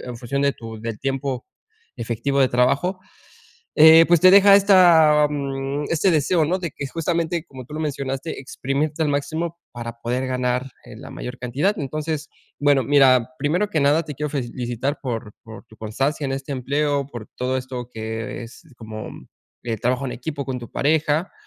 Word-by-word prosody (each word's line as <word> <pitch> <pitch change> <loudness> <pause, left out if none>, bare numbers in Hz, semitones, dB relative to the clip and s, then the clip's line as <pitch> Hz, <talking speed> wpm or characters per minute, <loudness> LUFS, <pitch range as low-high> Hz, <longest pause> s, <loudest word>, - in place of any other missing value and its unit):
en 125 -2 -7
función 140 +4 -2
de 140 - +2
tu 115 -3 -9
del 115 -2 -5
tiempo 135 -2 -3 0.5
efectivo 120 +4 -1
de 130 - +4
trabajo, 140 +10 +1 0.8
eh, 160 +2 +9
pues, 175 -2 +4
te 185 - +8
deja 200 0 +8
esta, 170 -7 +6
mm, 140 0 -3
este 170 +3 +2
deseo, 160 +1 +2
¿no?, 180 +5 0
de 175 -3 -4
que 140 - -5
justamente 165 +1 -2
como 130 -6 -11
tú 135 - -14
lo 155 - -4
mencionaste, 140 0 -4
exprimirte 140 +3 -3
al 155 - +1
máximo 160 +4 -2
para 115 -1 -7
poder 125 +3 -2
ganar, 125 0 -1
eh, - - -12
la - - -10
mayor 125 +1 -7
cantidad, 140 - -1
entonces, 155 +2 -4 0.3
bueno, 145 -2 +3
mira, 130 -1 +4
primero 175 +9 0
que 160 - 0
nada 145 +4 +3
te 150 -2 -7
quiero 150 +2 -3
felicitar 125 0 -3
por 115 -5 -5
por 110 +1 -12
tu 110 -1 -19
constancia 135 +7 -2
en 135 - -2
este 135 +1 -5
empleo 140 +2 -1
por 120 -5 -9
todo 130 +1 -1
esto 125 -2 -5
que 110 +1 -5
es 115 +9 -12
como, 110 -1 -8 0.5
eh, 115 -2 -3
trabajo 125 +4 0
en 125 - -3
equipo 140 +3 -5
con 130 -2 -4
tu 120 -2 -10
pareja, 155 +3 +1
140 Hz, 180 wpm, -22 LUFS, 125-155 Hz, 0.8 s, eh